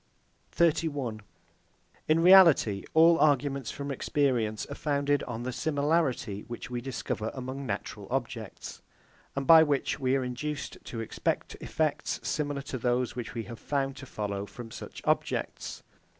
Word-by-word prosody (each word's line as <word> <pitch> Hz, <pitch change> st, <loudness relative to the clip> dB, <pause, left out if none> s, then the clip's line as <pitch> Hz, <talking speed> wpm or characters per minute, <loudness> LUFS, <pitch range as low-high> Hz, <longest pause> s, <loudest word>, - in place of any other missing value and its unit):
31. 145 Hz, -9 st, +1 dB, 0.9 s
In 155 Hz, +1 st, +4 dB
reality, 170 Hz, -, +7 dB
all 165 Hz, +1 st, +7 dB
arguments 140 Hz, -3 st, +2 dB
from 140 Hz, 0 st, -5 dB
experience 125 Hz, -6 st, 0 dB
are -, -, -7 dB
founded 145 Hz, -1 st, 0 dB
on 120 Hz, -1 st, -5 dB
the 125 Hz, -, -2 dB
similarity 145 Hz, -7 st, 0 dB
which 120 Hz, +1 st, -7 dB
we 120 Hz, -1 st, -2 dB
discover 125 Hz, -4 st, -3 dB
among 130 Hz, +1 st, -5 dB
natural 100 Hz, -1 st, -4 dB
objects, 120 Hz, -5 st, -4 dB, 0.5 s
and 140 Hz, 0 st, -2 dB
by 160 Hz, +3 st, +9 dB
which 145 Hz, -3 st, +1 dB
we 130 Hz, -1 st, +2 dB
are 135 Hz, -, +1 dB
induced 140 Hz, +4 st, -4 dB
to 115 Hz, -, -5 dB
expect 115 Hz, -, -2 dB
effects -, -, -1 dB
similar 145 Hz, -2 st, -2 dB
to 130 Hz, -2 st, -5 dB
those 125 Hz, +1 st, 0 dB
which 120 Hz, -1 st, -6 dB
we 115 Hz, -, -2 dB
have 115 Hz, 0 st, -9 dB
found 135 Hz, -2 st, -1 dB
to 135 Hz, -, -10 dB
follow 100 Hz, -2 st, -4 dB
from 115 Hz, +4 st, -10 dB
such -, -, -9 dB
objects. -, -, -1 dB
135 Hz, 145 wpm, -29 LUFS, 115-145 Hz, 0.9 s, by